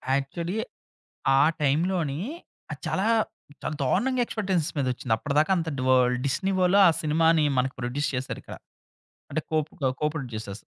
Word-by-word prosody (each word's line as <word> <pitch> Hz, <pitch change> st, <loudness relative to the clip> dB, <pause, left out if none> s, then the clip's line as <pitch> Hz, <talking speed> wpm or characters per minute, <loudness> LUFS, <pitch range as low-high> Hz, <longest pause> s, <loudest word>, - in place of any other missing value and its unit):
Actually 170 Hz, +8 st, -3 dB, 0.8 s
ఆ -, -, +6 dB, 0.2 s
టైం‌లోని 155 Hz, 0 st, +1 dB, 0.5 s
అది -, -, -7 dB
చాలా 195 Hz, -, 0 dB, 0.6 s
చాలా 155 Hz, -, -2 dB
దారుణంగా 245 Hz, -, +1 dB
ఎక్స్‌పెక్టేషన్స్ 190 Hz, -8 st, -1 dB
మీదోచ్చింది. 125 Hz, -3 st, 0 dB
అప్పటిదాకా 150 Hz, +8 st, +1 dB
అంతటి 160 Hz, -6 st, -3 dB
వల్డ్ 125 Hz, -1 st, +4 dB
డిస్నివోలో 185 Hz, +6 st, +2 dB
ఆ -, -, +6 dB
సినిమాని 160 Hz, +1 st, +3 dB
మనకి 130 Hz, +1 st, +1 dB
ప్రొడ్యూస్ 130 Hz, +4 st, -1 dB
చేశారిక్కడ. 130 Hz, +1 st, -5 dB, 0.8 s
అంటే 155 Hz, +2 st, -1 dB
కోపుక 150 Hz, -3 st, 0 dB
కో‌ప్రొడ్యూసర్స్. 120 Hz, -9 st, -4 dB
150 Hz, 115 wpm, -26 LUFS, 130-170 Hz, 0.8 s, ఆ